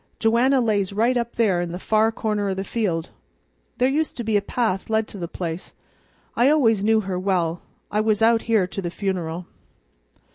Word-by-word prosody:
Joanna 245 +4 +3
lays 205 -4 0
right 230 +5 +2
up 235 -1 -2
there 200 -7 +2
in 175 -1 -4
the - - -3
far 220 +3 +2
corner 210 -2 -1
o' 190 - -1
the 190 - -3
field. 185 -7 -2 0.7
There 255 - +3
used 305 +4 -1
to 240 - -3
be 220 -1 0
a 205 - +4
path 200 -2 -2
led 220 0 +1
to 200 - -9
the 170 - -4
place. 170 0 -6 0.6
I 245 +4 +4
always 225 -9 +3
knew 220 +1 +3
her 185 -2 -3
well. 175 -3 0 0.3
I 210 - +1
was 215 -1 +1
out 225 0 +4
here 215 -5 +4
to 195 +2 -5
the 175 - -3
funeral." 175 -3 -3
210 Hz, 195 wpm, -23 LUFS, 185-230 Hz, 0.7 s, a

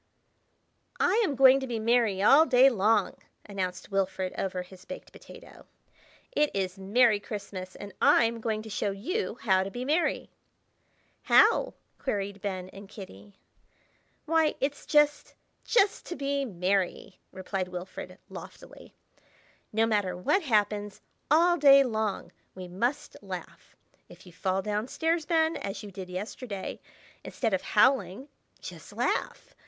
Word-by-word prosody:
"I 420 +6 +3
AM 300 -9 -1
going 265 +1 +7
to 265 - -5
be 235 -2 -3
merry 220 -3 +1
all 305 +9 +6
day 260 +1 +6
long!" 210 -2 +1 0.3
announced 190 -2 -5
Wilfrid 190 -1 -1
over 185 -1 -3
his 185 0 -15
baked - - -10
potato. - - -15 0.6
"It 300 -11 +2
is 190 -1 -2
Merry 210 +2 +3
Christmas 200 -2 -7
and 205 -2 -9
I'm 230 0 +4
going 220 -1 -2
to 220 - -10
show 205 - -1
you 245 - -3
how 190 -4 +3
to 190 - -3
be 245 +5 -6
merry." 310 +5 0 0.9
"How?" - - +4 0.2
queried 200 -5 -3
Ben 185 -2 -4
and 195 +1 -12
Kitty. 105 - -12 0.9
"Why, 320 -1 +2
it's 285 +2 -3
just—just 300 +7 +1
to 350 - -5
be 280 0 -1
merry!" 190 -2 -2
replied 190 0 -4
Wilfrid, 180 +1 -8
loftily. - - -12 0.8
"No 220 +1 +2
matter 205 -5 0
what 280 - +1
happens, 210 - 0 0.3
all 345 +4 +4
day 275 -3 +7
long, 220 -5 -2 0.2
we 185 -1 -8
must 235 +10 -3
laugh. - - -9 0.3
If - - -15
you 180 - -14
fall 190 +2 -1
down 210 +3 -2
stairs, 325 +2 -1
Ben, 320 -1 +2
as 200 +2 -6
you 205 - -9
did 185 -1 -8
yesterday, 200 +2 -6 0.4
instead 225 -5 -2
of 190 - +1
howling, 230 +2 +2 0.3
just - - -10
laugh! - - -2
210 Hz, 135 wpm, -28 LUFS, 190-275 Hz, 0.9 s, going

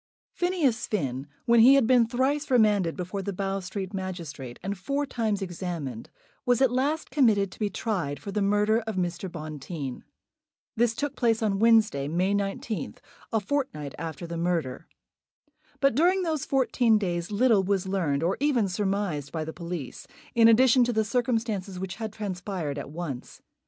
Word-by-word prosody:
Phineas 330 -11 0
Finn, 135 - -2 0.2
when 235 0 +5
he 255 +5 +8
had 275 -4 +4
been 240 -1 +4
thrice 270 +5 0
remanded 210 -8 +3
before 185 +2 -4
the 200 - -3
Bow 195 +1 -2
Street 190 +1 -5
magistrate, 170 -10 -6
and 195 +1 -2
four 275 +10 -2
times 220 -6 -1
examined, 170 - -5 0.3
was 245 -1 +2
at 265 -2 +4
last 285 +5 -1
committed 215 -9 +3
to - - -14
be 210 -2 0
tried 180 -8 -2
for 200 - -7
the 210 +1 -1
murder 210 +2 +3
of 220 - -3
Mr. 175 0 -2
Bonteen. 155 -4 -6 0.7
This 230 0 +2
took 285 +1 -3
place 225 -2 +1
on 200 -2 +1
Wednesday, 220 -11 +4
May 180 +6 +1
19th, 200 +2 -3 0.3
a 225 - +2
fortnight 205 - -3
after 165 +1 -5
the 170 0 -5
murder. 165 -7 -2 0.9
But 275 -2 +3
during 360 +8 +3
those 315 -5 -1
fourteen 250 -4 +3
days 175 -4 -2
little 215 0 +4
was 195 -1 0
learned, 165 -7 0
or 180 +3 +1
even 265 -7 +2
surmised, 190 -7 -2
by 160 -2 -3
the 160 - -6
police, 170 -6 -6 0.3
in 230 -1 +6
addition 250 +2 +6
to 240 - -1
the 220 -1 +1
circumstances 225 -5 -1
which 190 -1 -5
had 220 -1 -4
transpired 185 -7 -4
at 140 - -7
once. 150 -5 -7
200 Hz, 165 wpm, -27 LUFS, 175-235 Hz, 0.9 s, he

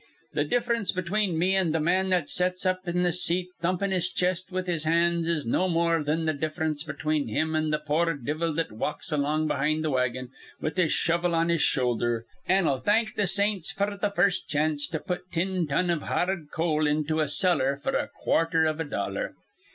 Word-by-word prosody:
Th' 145 0 0
diff'rence 235 -3 +1
between 185 0 0
me 185 +4 +2
an' 185 -5 +2
th' 160 - +1
man 185 +4 +2
that 180 -5 +1
sets 180 +1 0
up 185 0 0
in 180 +1 +1
th' 175 - +1
seat 180 +1 0
thumpin' 185 +3 0
his 180 -2 0
chest 185 +1 -1
with 185 0 -2
his 170 -4 -2
hands 170 +1 +2
is 165 -4 0
no 185 +11 +1
more 165 -1 +2
thin 155 +2 0
th' 155 -2 -1
diff'rence 155 0 -2
between 150 -2 -1
him 160 +8 -1
an' 155 -1 +1
th' 150 0 -2
poor 165 +2 +1
divvle 150 +5 -2
that 165 +2 -1
walks 115 +10 -4
along 150 +1 +1
behind 155 +1 0
th' 155 - 0
wagon 125 -1 -1 0.3
with 155 - -3
his 180 -4 +2
shovel 170 +1 +1
on 165 +1 +2
his 170 -2 +2
shoulder, 120 -2 +1 0.2
an' 185 -2 +3
'll 135 -2 +1
thank 215 - +2
th' 200 -3 +1
saints 200 -2 +1
f'r 200 +1 -1
th' 205 -1 0
first 180 +1 +2
chanst 150 -1 0
to 160 - -1
put 180 +2 -5
tin 180 0 0
ton 175 +5 +1
iv 165 -3 0
ha - - 0
ard 180 -5 -3
coal 155 -2 +1
into 155 +1 0
a 150 - 0
cellar 140 -5 +2
f'r - - -2
a - - 0 0.2
quarther 165 -1 +3
iv 155 0 0
a - - 0
dollar. - - -3
165 Hz, 210 wpm, -27 LUFS, 150-185 Hz, 0.3 s, an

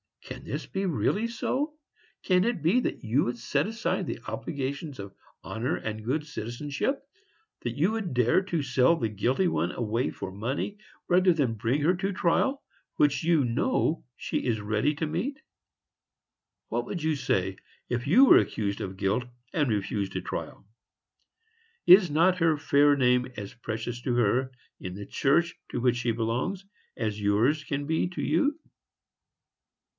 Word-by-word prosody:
Can - - -8
this - - -4
be 195 +1 -3
really 200 +6 0
so? 280 +5 -2 0.5
Can 180 -1 +3
it 235 -10 -1
be 180 +10 +4
that - - -3
you 120 +6 +2
would 120 0 -2
set 140 +6 0
aside 225 +1 -2
the - - -4
obligations 140 0 -4
of 100 -1 -8 0.3
honor 115 +3 -2
and 110 0 -5
good 150 +5 -1
citizenship,—that 150 - -5
you 170 +8 +3
would 220 -8 -3
dare 125 +8 +4
to 170 -5 -2
sell 130 +4 +3
the 115 -8 -1
guilty 125 - +1
one 85 - 0
away 115 +2 -1
for 95 - -6
money, 125 - -3 0.3
rather 180 0 +5
than 140 -8 +1
bring 120 +7 0
her 165 +5 +4
to 195 +2 -2
trial, 265 +10 +1 0.3
which 145 +2 +2
you 160 -4 +3
know 155 - 0
she - - -3
is 115 -4 0
ready 110 +8 0
to 160 - -2
meet? 275 - -3 1.3
What - - -1
would 175 -5 -5
you 160 -1 +1
say, 95 -8 -1 0.3
if 120 +1 -2
you 240 - +7
were - - +8
accused 100 -2 0
of 95 0 -5
guilt, 100 +6 0 0.3
and 145 -5 +1
refused 100 -2 -2
a - - -1
trial? - - -6 1.2
Is 185 0 +8
not 180 +5 +3
her 165 -2 +3
fair 145 0 +4
name 125 -2 +3
as 100 -2 -6
precious 120 0 -5
to 125 - 0
her, 120 +3 +2 0.3
in 90 -1 -6
the 100 +1 -7
church 170 +9 +2 0.2
to - - -3
which 125 -1 +2
she 120 -1 0
belongs, 120 - -2 0.3
as 105 -2 -2
yours 115 +10 +2
can 145 -1 -3
be 160 +3 +1
to 180 - -5
you? 290 +1 +2
140 Hz, 160 wpm, -27 LUFS, 115-175 Hz, 1.3 s, were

